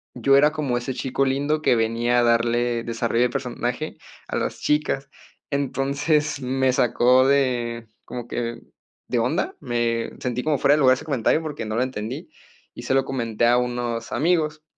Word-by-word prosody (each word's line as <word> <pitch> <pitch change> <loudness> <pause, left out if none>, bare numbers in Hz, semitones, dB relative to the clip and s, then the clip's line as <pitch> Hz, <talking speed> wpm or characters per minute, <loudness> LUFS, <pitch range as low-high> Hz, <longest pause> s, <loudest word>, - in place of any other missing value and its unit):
yo 140 0 +4
era 150 +2 +5
como 140 -6 -1
ese 120 +2 -3
chico 135 +1 -1
lindo 145 +3 0
que 125 - +3
venía 115 +2 +1
a 120 - +3
darle 120 0 +1
desarrollo 115 +1 0
de 125 - +2
personaje 125 +3 -3 0.3
a - - -2
las - - -3
chicas. 145 -2 0 0.4
Entonces, 140 +2 0
me 130 0 +1
sacó 125 0 +4
de 120 -4 0 0.2
como 120 -1 -7
que 120 -1 -4 0.5
de - - +1
onda. - - 0
Me 115 -1 -1
sentí 125 0 -2
como, 150 -2 +1
fuera 140 +1 +4
de 150 - 0
lugar 130 -2 +6
ese - - -9
comentario 140 +1 +1
porque 150 -7 -5
no 110 - -3
lo 120 - +2
entendí, 110 -5 -5 0.5
y - - -8
se - - -1
lo 135 - +3
comenté 120 -4 -1
a 120 +1 +4
unos 120 -2 -2
amigos. 155 +1 0
125 Hz, 175 wpm, -23 LUFS, 120-140 Hz, 0.5 s, lugar